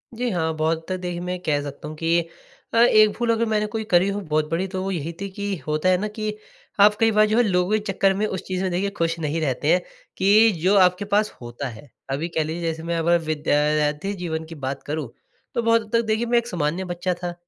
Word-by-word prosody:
जी 245 +1 -1
हाँ, 160 -3 0
बहुत 160 +1 +1
हद 165 - -21
तक 185 - 0
देखिए, 175 -1 -4
मैं 180 0 -3
ये 180 - -5
कह 145 -2 +1
सकता 145 +1 -7
हूँ 155 - -7
कि 165 +2 +2 0.5
अ, 230 - +1
एक 215 -2 +6
भूल 235 0 -1
अगर 230 0 +1
मैंने 210 -1 +1
कोई 220 +1 -4
करी 180 +2 +5
हो 200 - -2
बहुत 155 -2 -1
बड़ी, 170 +4 -1
तो 185 0 -4
वो 195 - -2
यही 165 -2 -3
थी 200 - -3
कि 200 0 -3
होता 155 +4 +1
है 185 - +4
ना 210 +3 -2
कि 215 0 -4 0.5
आप 210 +1 +7
कई 225 0 +4
बार 215 0 +5
जो 215 +2 +1
है 245 - +5
लोगों 180 -1 +1
के 215 - +3
चक्कर 195 0 +2
में 205 +2 0
उस 190 -4 -3
चीज़ 185 0 -2
में 190 - 0
देखिए 195 +3 0
ख़ुश 165 0 0
नहीं 160 +1 -2
रहते 145 +2 +1
हैं, 180 - +2 0.4
कि 210 +4 +5
जो 190 +3 +3
आपके 180 +2 +4
पास 210 +1 +2
होता 120 +3 -5
है। 115 +5 -12 0.2
अभी 145 +5 -2
कह 160 -2 0
लीजिए 160 +3 -4
जैसे 160 0 -3
मैं 170 0 -2
अगर 170 +1 +3
विद्यार्थी 150 +3 0
जीवन 160 -2 -3
की 165 - -8
बात 135 +1 -4
करूँ 150 -2 -3 0.5
तो 235 - +1
बहुत 230 0 +4
हद 215 - -14
तक 230 - +4
देखिए 220 +2 +1
मैं 240 0 +2
एक 235 - 0
सामान्य 170 -2 -1
बच्चा 175 +1 -2
था 175 -1 -2
180 Hz, 255 wpm, -23 LUFS, 160-210 Hz, 0.5 s, आप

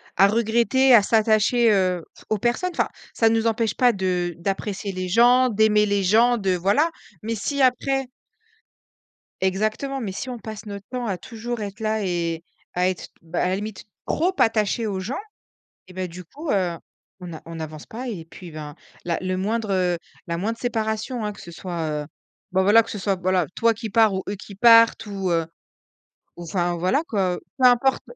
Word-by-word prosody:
à 195 +2 +6
regretter, 235 +4 +3
à 230 - +9
s'attacher, 220 +2 +3
heu, 185 -3 +1 0.2
aux 215 - +1
personnes, 240 - 0
enfin, - - +1 0.3
ça 225 - +4
nous 225 0 +1
empêche 225 0 +1
pas 250 -1 +4
de 180 -3 -1
d'apprécier 195 +3 -3
les 185 -1 -4
gens, 245 +5 +5
d'aimer 210 -1 +3
les 200 -1 +1
gens, 230 +6 +4
de 195 -4 0
voilà, 200 - +2 0.3
mais 225 +1 -2
si 280 +7 -2
après 270 +1 +2 1.4
exactement, 215 +8 -1
mais 210 -5 -3
si 220 +7 -5
on 250 - -5
passe 220 -1 -8
notre 200 -1 -7
temps 250 -1 -3
à 195 -5 -2
toujours 235 +1 -6
être 200 -1 -6
là 220 -1 -1
et 170 -2 -2 0.3
à 180 +1 +2
être, 185 - -5
bah, 165 +1 -3
à - - +2
la 185 - +1
limite, 210 0 -6 0.2
trop 355 +4 +1
attachées 225 0 +2
aux 200 -3 -2
gens, 205 +8 -4 0.7
et 185 - -13
bah, 185 0 -3
du 180 +1 -9
coup, 290 - -8
heu, 180 -4 0 0.4
on 180 -2 -8
a 160 - -8
on 165 - -8
n'avance 155 -1 -7
pas 245 +4 -7
et 200 -9 -5
puis, 170 +1 -12
ben, 150 -1 -8 0.3
la 170 -1 -1
le 185 0 -2
moindre, 215 +3 -1
heu, 180 -2 +1 0.3
la 170 0 -2
moindre 220 +6 -2
séparation, 220 0 -2
hein! 210 - -3
Que - - -13
ce 170 - -10
soit, 165 -4 -3
heu, - - -10 0.5
bah 190 +1 +3
voilà, 210 +4 +7
que 225 - -9
ce - - -4
soit, 195 0 0
voilà, 185 -1 +1
toi 230 0 +3
qui 225 0 -6
pars 220 -1 +4
ou 190 - -2
eux 205 - -2
qui 200 0 -11
partent 230 +2 +6
ou, 195 -3 -3
heu, 165 -1 +1 0.9
ou, 175 - -8
enfin 175 0 -1
voilà 185 - +1
quoi, 190 -4 0
heu, - - -7 0.2
peu 255 - +6
importe 250 +2 +3
205 Hz, 200 wpm, -23 LUFS, 185-230 Hz, 1.4 s, à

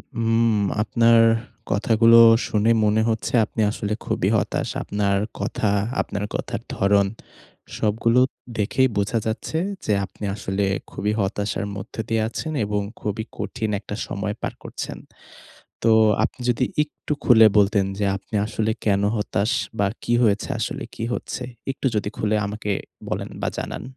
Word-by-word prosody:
হুম, 115 0 +2 0.3
আপনার 115 +1 +4 0.5
কথাগুলো 115 +2 +5 0.3
শুনে 110 +2 +2
মনে 105 +1 +3
হচ্ছে 110 -1 -2
আপনি 110 - -3
আসলে 105 -1 -3
খুবই - - 0
হতাশ। - - -1
আপনার 100 -1 0 0.2
কথা, 110 - -1 0.3
আপনার 105 0 -4
কথার - - -3
ধরণ 100 0 +3 0.7
সবগুলো 115 +3 +2 0.4
দেখেই 120 +5 +2
বোঝা 100 +3 +1
যাচ্ছে 110 +8 -2 0.3
যে 105 - +2
আপনি 105 - -8
আসলে 100 -1 -2 0.3
খুবই 105 +2 -1
হতাশার 100 +1 -1
মধ্যে 100 +3 -6
দিয়ে 115 -1 +1
আছেন 155 +7 -4
এবং 105 0 -1 0.2
খুবই 105 +1 -2
কঠিন 110 -3 -3
একটা 100 0 -7
সময় 105 +1 -3
পার - - -3
করছেন। - - -6 0.9
তো 115 - +4 0.3
আপনি - - -4
যদি 120 +2 +1 0.2
একটু 150 0 -6
খুলে 110 -3 +7
বলতেন 100 -1 +3
যে 105 - 0
আপনি 100 +3 -12
আসলে 110 0 -1
কেন 100 -2 +2
হতাশ 105 0 0 0.3
বা 100 - +3 0.2
কি - - -1
হয়েছে 105 -2 +2
আসলে 110 - -3
কি 115 - -4
হচ্ছে? 125 - -4 0.3
একটু 135 - -3
যদি 105 -1 0
খুলে 110 0 +1
আমাকে 105 0 -4 0.4
বলেন - - -3
বা - - +1
জানান। - - -4
105 Hz, 145 wpm, -23 LUFS, 100-115 Hz, 0.9 s, খুলে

